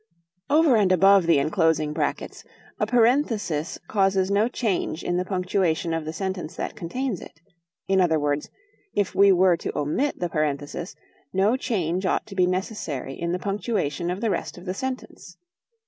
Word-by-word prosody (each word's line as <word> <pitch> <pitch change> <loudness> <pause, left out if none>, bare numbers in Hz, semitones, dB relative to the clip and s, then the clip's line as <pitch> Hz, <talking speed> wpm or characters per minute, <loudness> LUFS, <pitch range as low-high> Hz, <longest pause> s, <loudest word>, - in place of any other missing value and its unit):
Over 300 -4 +5
and 200 -3 +3
above 195 0 +5
the 165 -3 +5
enclosing 155 0 +1
brackets, 150 -2 -3 0.4
a - - +1
parenthesis 225 - +1
causes 195 -1 +1
no 205 +3 +3
change 205 -9 -2
in 175 - -1
the 180 - -1
punctuation 180 -2 0
of 165 -1 -2
the 155 - -3
sentence 185 -1 -4
that - - -4
contains 230 +4 -3
it; 155 - -13 0.5
in 190 -1 +3
other 160 -3 +3
words, 145 0 -1 0.5
if 205 -2 0
we 200 0 +6
were 185 -1 +5
to - - -5
omit 155 - -1
the 175 - 0
parenthesis, 155 +2 -3 0.4
no 195 +5 +2
change 190 - -1
ought - - 0
to 220 - -10
be 180 -2 +3
necessary 180 - -3
in 170 +4 -3
the 180 - 0
punctuation 180 -5 -2
of 185 +3 -3
the 225 -3 +1
rest - - -3
of 175 - -11
the 185 - -2
sentence. 260 +5 -6
185 Hz, 170 wpm, -24 LUFS, 165-205 Hz, 0.5 s, we